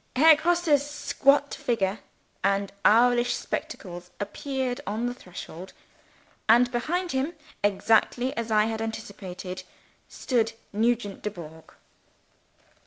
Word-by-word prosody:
Herr 315 +4 +8
Grosse's 320 -2 +2
squat 285 -1 +2
figure 205 -4 -1 0.4
and 195 0 +1
owlish 240 +2 +5
spectacles 175 -2 -5
appeared 260 +5 -3
on 220 +3 -1
the 245 - -1
threshold. 180 -3 -10 0.8
And 245 +2 +6
behind 345 +9 -1
him 270 +6 -1 0.3
(exactly 225 +5 +2
as 230 0 -3
I 215 -1 +4
had 220 0 -3
anticipated) 190 -4 -6 0.5
stood 230 -3 0 0.2
Nugent 220 -2 0
Dubourg. 160 -6 -8
230 Hz, 105 wpm, -26 LUFS, 200-265 Hz, 0.8 s, Herr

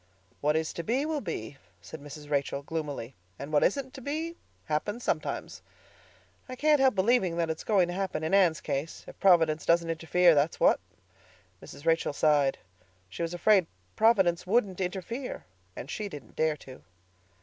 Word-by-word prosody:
"What 150 +1 +1
is 160 0 -1
to 170 - -5
be, 255 - 0
will 310 -2 -2
be," 140 - -5 0.2
said 100 - -10
Mrs. 145 +1 -10
Rachel 140 -1 -1
gloomily, 145 -5 -5 0.2
"and 140 +2 -8
what 145 - +4
isn't 265 +5 0
to 265 - -9
be 315 +5 -3 0.3
happens 205 +10 -2
sometimes. - - -3 0.9
I 255 - -5
can't 300 +2 +3
help 265 -4 +4
believing 190 -4 +2
it's 160 -1 -2
going 195 -5 +3
to - - -3
happen 190 -4 -3
in 160 - -2
Anne's 180 -5 +4
case, 145 +2 -4
if - - -13
Providence 165 -5 +4
doesn't 170 0 +2
interfere, 165 +2 +3
that's 150 +2 +1
what." - - +4 0.8
Mrs. 145 - -12
Rachel 165 -2 +2
sighed. 145 -2 +2 0.5
She 95 - -7
was 170 +1 -2
afraid 190 -1 +4 0.3
Providence 190 -6 +3
wouldn't 195 -3 +1
interfere; 195 +8 -4 0.3
and 125 - -7
she 205 +7 -4
didn't 145 -7 -11
dare 155 -1 +1
to. 130 -2 -13
170 Hz, 165 wpm, -28 LUFS, 150-205 Hz, 0.9 s, what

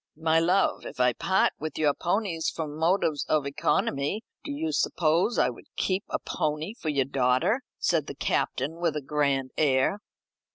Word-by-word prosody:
"My 160 0 +3
love, 180 +4 +2
if - - -9
I 125 -1 +4
part 190 +10 +2
with 155 +1 -5
your 150 -2 +3
ponies 175 -2 -1
from 155 -3 -5
motives 160 -2 +1
of 150 -2 +2
economy, 150 +5 0 0.2
do 295 - -5
you 315 +3 -2
suppose 170 - +1
I - - +3
would - - -14
keep 190 +1 0
a - - 0
pony 155 +5 -2
for 165 -9 -5
your 140 -3 +1
daughter?" 130 - +1 0.2
said 160 -4 +1
the - - -6
Captain 140 +3 -1
with 170 -3 0
a 150 - -3
grand 140 -2 0
air. 140 +6 +2
155 Hz, 170 wpm, -27 LUFS, 140-180 Hz, 0.2 s, I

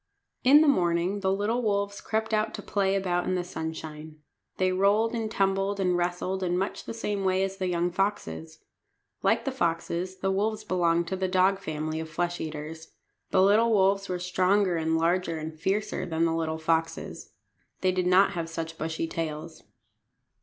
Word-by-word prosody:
In 285 +4 +8
the 315 - +4
morning 180 -5 +2
the 190 -1 +1
little 210 +5 0
wolves 200 -2 -1
crept 220 0 -2
out 215 0 +1
to - - -8
play 195 -1 +1
about 180 -2 0
in 185 - +1
the 180 - -1
sunshine. 160 -2 -6 0.4
They 185 0 +2
rolled 205 +5 +2
and 225 -2 -2
tumbled 195 -1 0
and 180 -2 +2
wrestled 175 +2 -1
in 180 -1 0
much 195 +2 -3
the - - -5
same 205 -3 -2
way 190 0 +2
as 195 0 -3
the 190 -1 -1
young 175 0 0
foxes. 185 -4 -3 0.6
Like - - +2
the 270 - 0
foxes 180 -4 -2
the 195 +1 -1
wolves 215 +2 -1
belonged 170 -3 +1
to 190 - -1
the 190 0 -1
dog 185 +1 +3
family 155 -3 -3
of 160 0 -5
flesh 175 +2 -2
eaters. 155 +1 -7 0.4
The 185 - +4
little 215 +4 +5
wolves 195 -1 +3
were 180 - -1
stronger 185 +1 +2
and 160 0 +1
larger 170 0 +1
and 155 0 -5
fiercer 190 +3 -2
than 165 0 +1
the 165 - +1
little 160 -1 -1
foxes. 165 0 -2 0.5
They 185 - +3
did 185 -1 0
not 190 +2 +5
have 170 -3 -4
such 165 0 -5
bushy 160 +1 -2
tails. 160 0 -5
185 Hz, 180 wpm, -27 LUFS, 165-195 Hz, 0.6 s, In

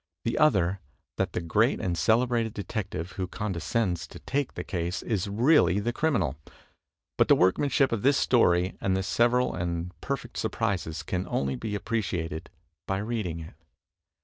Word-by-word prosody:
The 115 - 0
other 95 - +3 0.4
that - - -1
the - - -1
great 85 -1 +2
and 90 -2 -1
celebrated 115 +2 +2
de 100 - -3
tective 95 -4 -4
who 95 -1 -3
condescends 95 -1 -2
to - - -11
take 140 0 -2
the - - -4
case 85 -1 -3
is 105 -5 -1
really 105 - +4
the 120 +4 -1
crimi 155 +1 +1
nal. 75 -4 -2 0.8
But - - +5
the - - +7
workmanship 130 +9 +3
of 115 -3 -1
this 140 +3 +4
story 90 -7 +3
and 95 -1 +1
the 95 - -1
several 120 +5 +2
and 85 0 -3
perfect - - -4
surprises 85 -5 -2
can 90 0 -3
only 70 -1 -1
be 105 - -4
appreciated 90 -7 -3 0.4
by 95 - 0
reading 100 -6 -3
it. 80 - -10
95 Hz, 165 wpm, -27 LUFS, 85-115 Hz, 0.8 s, the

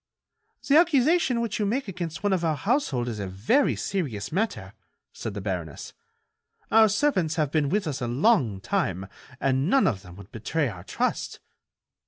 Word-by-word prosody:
"The 285 - +6
accusation 310 -5 +3
which 225 -3 -2
you 210 - +1
make 250 +4 -1
against 170 -3 -5
one 205 -1 +2
of 180 -2 0
our 160 -2 +1
household 150 - 0
is 115 -3 -4
a 100 - -3
very 105 - +2
serious 130 - -3
matter," 155 - -2 0.4
said 105 - -6
the 100 - -4
baroness. 90 -6 -5 0.8
"Our 220 -1 +6
servants 190 - +1
have 155 -4 0
been 150 -3 +1
with 205 +3 0
us 145 -5 -3
a 120 - -1
long 125 - +2
time 95 - -1 0.3
and 135 +3 +1
none 270 +3 +4
of 105 -10 0
them 90 -2 -13
would 100 0 -13
betray 130 +6 -1
our 90 -5 -9
trust." - - -2
155 Hz, 175 wpm, -26 LUFS, -, 0.8 s, The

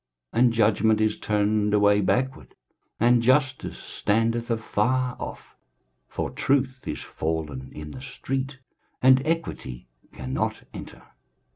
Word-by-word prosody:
23:059:014 - - 0
And 120 -2 +4
judgment 110 -1 +3
is 110 -1 +1
turned 105 0 +1
away 105 0 +4
backward, 130 +7 -1 0.4
and 120 +1 +5
justice 130 +2 +2
standeth 115 +3 0
afar 120 +3 0
off: - - -8 0.5
for - - -3
truth 130 -1 0
is 75 - -3
fallen 75 -5 -4
in 75 0 -8
the 130 - -9
street, 135 0 -4 0.5
and 130 0 +7
equity 65 - -3 0.2
cannot 65 0 -3
enter. - - -9
115 Hz, 120 wpm, -25 LUFS, 105-130 Hz, 0.5 s, and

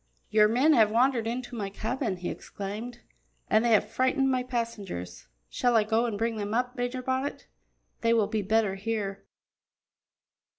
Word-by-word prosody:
"Your 210 0 +6
men 260 +8 +4
have 220 -6 +5
wandered 235 0 +2
into 245 +1 -4
my 205 -3 -3
cabin," 220 0 -3
he 175 0 -4
exclaimed, 220 +5 -7 0.5
"and 215 +1 +5
they 240 - +2
have 210 -2 +4
frightened 260 +4 +1
my 255 -1 +1
passengers. 210 - -5 0.2
Shall 245 -1 +1
I 220 - +5
go 225 +3 +1
and 215 -3 -3
bring 225 +1 -1
them 205 +1 -2
up, 250 +1 0
Major 245 +1 -3
Bonnet? 260 +2 -2 0.5
They 230 - +2
will 225 -2 +4
be 215 +1 -1
better 210 0 +1
here." 200 -1 -4
230 Hz, 165 wpm, -28 LUFS, 210-245 Hz, 0.5 s, Your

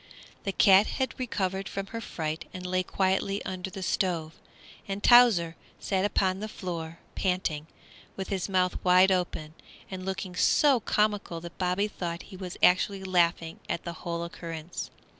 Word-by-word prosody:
The 195 - 0
cat 195 +1 +6
had 260 -1 -3
recovered 195 -6 -2
from 195 0 -4
her 230 - -3
fright 160 -6 -4
and 180 0 -7
lay 185 0 +1
quietly 190 +2 0
under 185 0 -4
the 190 0 -7
stove, 170 -5 -1 0.5
and 195 +1 -4
Towser 220 -10 +6 0.2
sat 190 -1 0
upon 190 -2 +1
the 215 - -4
floor 170 -5 -6 0.2
panting, 180 -5 -1 0.5
with 190 - -5
his 195 -1 -2
mouth 185 -1 +1
wide 185 +1 +6
open, 175 -4 -1 0.4
and 185 -1 -5
looking 190 -1 -4
so 275 +7 +4
comical 205 -5 0
that 170 0 -10
Bobby 185 +3 +1
thought 170 -4 -5
he 195 - -12
was 185 -1 -7
actually 190 +2 +4
laughing 170 -3 +1
at 170 - -2
the 170 - -5
whole 170 -1 -3
occurrence. 170 0 -6
185 Hz, 160 wpm, -28 LUFS, 170-195 Hz, 0.5 s, cat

